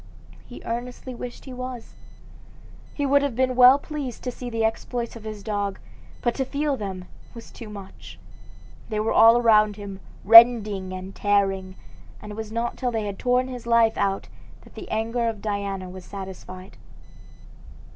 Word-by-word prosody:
He 245 - -11
earnestly 245 +2 -5
wished 245 0 -8
he 260 - -8
was. 250 -2 -7 1.0
He 285 - -2
would 280 +1 +4
have 280 -4 -2
been 255 0 +1
well 255 +2 +8
pleased 285 -4 -6
to 250 - -3
see 245 0 -7
the 225 -1 0
exploits 235 +1 -3
of 225 -1 -11
his 215 -2 -7
dogs, 205 -2 -3 0.4
but 240 - +1
to 270 - -1
feel 285 +2 -1
them 190 -5 -6 0.3
was 230 - -11
too 230 -3 -10
much. 200 -2 -11 0.7
They 215 -2 -2
were 215 +1 0
all 230 +1 +7
around 215 -3 +4
him, 200 -2 -8 0.3
rending 215 -4 +7
and 185 +1 -7
tearing; 195 -2 0 0.4
and 210 - -10
it - - -7
was 220 -1 -6
not 235 +1 -3
till 255 - -1
they 225 -3 -2
had 200 -2 -5
torn 250 +1 +1
his 250 -2 -8
life 230 -1 +4
out 195 -1 -1 0.3
that - - -18
the - - -9
anger 230 +2 -1
of 220 -2 -6
Diana 200 -2 -3
was 185 0 -10
satisfied. 190 -1 -9
225 Hz, 170 wpm, -24 LUFS, 200-245 Hz, 1.0 s, well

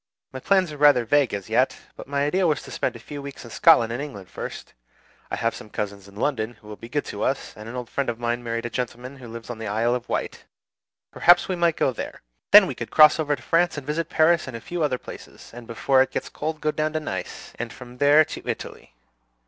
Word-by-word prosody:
My 130 - -5
plans 185 +2 +2
are 150 - -8
rather 145 -5 +5
vague 145 +2 +3
as 100 -2 -5
yet; - - +2 0.2
but - - -10
my 140 0 0
idea 180 +4 +2
was 150 -4 0
to - - -11
spend - - -2
a - - -9
few 145 +4 -8
weeks 140 -2 -9
in 115 - -11
Scotland 115 0 +5
and 120 - -3
England 105 -11 -8
first, - - -7 0.6
I - - -2
have - - 0
some 105 - -10
cousins 100 -1 -5
in 100 - -16
London 120 -1 -1
who 105 - -19
will 105 - -7
be 115 +2 -11
good 145 +2 -1
to 100 - -6
us; 135 - -1
and 105 +1 -9
an 120 - -7
old 125 -1 -5
friend 140 +1 -2
of 115 - -3
mine 120 0 -2
married 115 0 -3
a 120 - -4
gentleman 125 +2 -5
who 125 -2 -11
lives 115 +1 -8
on 115 - -7
the 110 - -5
Isle 115 +3 +1
of 125 -1 -4
Wight; - - -3 0.7
perhaps 175 +1 +5
we 185 - -1
might 170 -2 +2
go - - +2
there. 120 - -7 0.3
Then - - +9
we - - -3
could - - -6
cross 155 +1 +7
over 150 -2 +1
to 125 - -16
France 165 +1 +2
and 145 - -6
visit 155 +3 -2
Paris 160 0 +3
and 125 -3 -5
a - - -9
few 175 +8 -5
other 140 -4 +1
places; - - -12
and 120 -1 -10
before 130 +3 +2
it 135 - +2
gets - - -4
cold 155 0 -4
go 155 +1 +1
down 155 0 -1
to 155 - 0
Nice, 95 -12 -6
and 120 0 -4
from 125 0 -12
there 145 +2 +6
to - - -7
Italy. - - -6
130 Hz, 255 wpm, -24 LUFS, 115-150 Hz, 0.7 s, Then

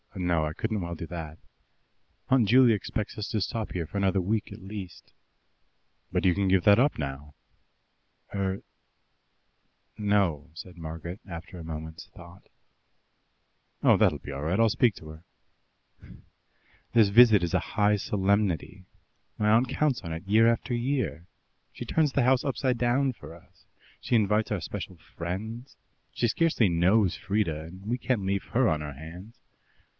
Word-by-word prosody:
No, 90 -4 0
I 75 - -3
couldn't 110 +3 -2
well 85 0 -4
do 85 - -6
that. 80 -2 -7 0.9
Aunt 130 -5 +4
Juley 125 0 +6
expects 105 +3 -4
us 105 0 -4
to 110 - -1
stop 110 +3 -3
here 85 -3 -3
another 100 -1 +1
week 100 +4 -1
at - - -10
least." 95 -2 -9 1.0
"But - - 0
you 90 - +5
can 100 +2 0
give 95 -1 +3
that 100 +1 +6
up 140 +3 +2
now." 70 0 -6 1.0
"Er 95 -1 -2 1.4
no," 100 -8 +1
said 90 +2 -10
Margaret, 80 +3 -7
after 85 0 -8
a - - -8
moment's 80 0 -7
thought. - - -15 1.3
"Oh, - - +6
that'll - - +2
be - - -8
all 70 0 -5
right. 85 +7 0
I'll 115 -1 +5
speak 115 -1 +2
to 75 - -11
her." 80 +1 -12 1.7
"This 110 -4 +5
visit 110 -1 +7
is 85 0 -2
a 95 - +3
high 105 +3 +1
solemnity. 100 -2 -1 0.5
My 105 0 +1
aunt 120 +3 +4
counts 140 -1 0
on 85 -4 -7
it 80 +3 -6
year 110 +3 +5
after 115 +2 0
year. 120 - -2 0.4
She - - -8
turns 155 -3 +1
the 140 - +1
house 130 +1 +3
upside 130 -2 0
down 125 +3 +1
for 80 - -12
us; 85 - -20 0.4
she 120 - 0
invites 105 0 +2
our 100 -4 -1
special 95 +1 -6 0.2
friends 110 +9 -6 0.3
she 120 - 0
scarcely 120 - +2
knows 90 +4 +3
Frieda, 95 -7 -1
and 95 +4 -12
we 120 +3 -1
can't 125 -4 -1
leave 100 0 -1
her 125 0 +2
on 80 -5 0
her 75 -1 -6
hands. 85 - -11
100 Hz, 160 wpm, -27 LUFS, 85-115 Hz, 1.7 s, visit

